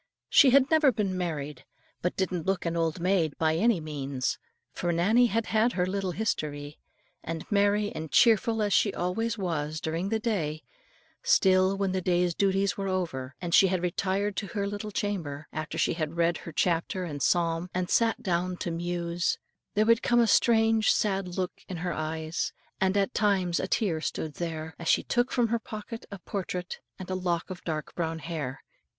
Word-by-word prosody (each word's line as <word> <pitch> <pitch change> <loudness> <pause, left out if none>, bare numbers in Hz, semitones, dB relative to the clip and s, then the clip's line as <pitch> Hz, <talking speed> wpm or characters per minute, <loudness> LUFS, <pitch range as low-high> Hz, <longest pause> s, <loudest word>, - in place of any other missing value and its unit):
She 280 - +7
had 270 +2 +4
never 310 -4 +5
been 200 -5 -1
married, 150 -7 -4 0.4
but 180 - -1
didn't 185 -3 -2
look 195 -2 0
an 170 0 -1
old 165 0 0
maid 175 -4 +1
by 160 -1 +2
any 220 +2 +3
means. 140 -4 -3 0.3
For 175 - -2
Nannie 215 +9 +4
had 225 0 0
had 225 +2 +2
her 180 - +1
little 190 0 -2
history. 150 -9 -3 0.4
And 165 -1 -5
merry 205 0 +2
and 155 -1 -6
cheerful 225 -1 +4
as 205 -2 +1
she 205 - +4
always 225 +6 -1
was 155 -5 -2
during 165 +5 -2
the 225 - +1
day, 165 -10 -2 0.6
still, 190 - +4
when 195 -1 0
the 185 0 -1
day's 175 -1 +1
duties 195 +1 +1
were 195 -1 -3
over, 160 -9 -3
and 175 -2 -4
she 195 -1 +7
had 185 -1 -1
retired 195 +3 0
to 200 - -2
her 200 +2 -2
little 205 +1 -4
chamber, 170 -9 -3
after 155 0 -4
she - - +2
had 160 0 -3
read 170 0 +2
her - - -7
chapter 170 +3 0
and 145 -5 -5
psalm 170 +3 +1
and 180 0 -1
sat 230 -1 +2
down 180 0 -1
to 175 - -3
muse, 170 0 -1 0.4
there 215 +1 +3
would 230 0 +4
come 240 0 +3
a 235 - +5
strange 225 0 +4
sad 195 -3 0
look 185 -1 -3
in 185 - -4
her 175 +1 -2
eyes, 155 +1 -3 0.3
and 190 +1 +2
at 200 +4 +1
times 190 -5 +1
a - - -2
tear 185 -7 0
stood 155 -1 -3
there, 160 -1 -4
as 170 - -6
she - - +4
took 245 +1 0
from 240 -3 +2
her 235 +1 +1
pocket 225 +1 -8
a 200 - -7
portrait 180 -1 -5 0.2
and 185 -1 -7
a - - 0
lock 180 -1 -2
of 180 - -8
dark 155 -2 -4
brown 165 -2 -2
hair. 150 -5 -5
180 Hz, 190 wpm, -28 LUFS, 165-205 Hz, 0.6 s, She